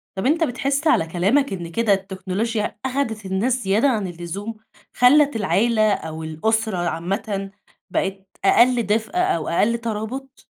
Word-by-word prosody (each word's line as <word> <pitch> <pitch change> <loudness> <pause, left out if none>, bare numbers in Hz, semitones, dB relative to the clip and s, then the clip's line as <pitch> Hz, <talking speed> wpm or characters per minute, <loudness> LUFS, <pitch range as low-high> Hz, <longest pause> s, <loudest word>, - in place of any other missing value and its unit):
طب 190 +6 -2
أنتَ 325 +4 +3
بتحس 275 +3 -1
على 165 - +4
كلامك 200 - +1
إن 170 -3 -5
كده 225 +1 +2
التكنولوجيا 195 +3 -2
أخدِت 250 -6 -2
الناس 230 +7 0
زيادة 210 +8 +3
عن 215 -6 0
اللزوم؟ 175 +6 -6 0.4
خلّت 285 +1 +5
العيلة 215 +1 +2
أو 160 -2 -6
الأسرة 220 +6 -1
عامةً 195 +4 -2 0.4
بقِت 195 0 -2 0.2
أقل 245 -1 +5
دفء 220 +1 0
أو 265 - +1
أقل 230 +7 +2
ترابط؟ 235 +4 -5
215 Hz, 135 wpm, -22 LUFS, 190-245 Hz, 0.4 s, خلّت